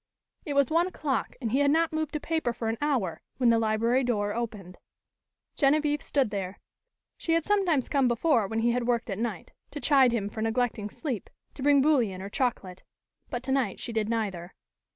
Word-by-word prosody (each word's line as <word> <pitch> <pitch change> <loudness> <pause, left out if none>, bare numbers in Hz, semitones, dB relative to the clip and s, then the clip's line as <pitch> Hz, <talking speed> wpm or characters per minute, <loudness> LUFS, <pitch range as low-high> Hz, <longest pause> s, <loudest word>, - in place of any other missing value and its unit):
It 290 - -2
was 280 +1 +3
one 335 +2 +3
o'clock 300 -7 -2
and 230 -4 -3
he 265 - +2
had 285 0 +4
not 325 +2 +2
moved 315 -1 -2
a - - 0
paper 320 -6 -1
for 225 -1 -3
an 225 - -2
hour, 255 - 0 0.2
when 245 -3 +4
the 230 - +3
library 230 +4 +2
door 205 -4 0
opened. 210 -6 -5 0.8
Genevieve 295 0 +2
stood 270 -7 0
there. 195 -1 -4 0.6
She 330 - -1
had 330 -1 +1
sometimes 370 -10 +2
come 275 -3 +2
before 240 -2 +2
when 225 +2 -2
he 235 +1 +3
had 245 0 -1
worked 235 -2 0
at 195 - -3
night, 225 -6 -4 0.2
to 295 - -6
chide 270 -4 +4
him 220 -4 -1
for 220 +2 -6
neglecting 225 -2 -1
sleep, 255 - -5 0.2
to - - -10
bring 285 0 +4
bouillon 245 -11 +2
or 195 +1 -6
chocolate. 200 -8 -2 0.5
But 245 0 -4
tonight 265 -1 0
she 235 - -5
did 220 -1 0
neither. 195 -6 -3
245 Hz, 195 wpm, -28 LUFS, 220-285 Hz, 0.8 s, had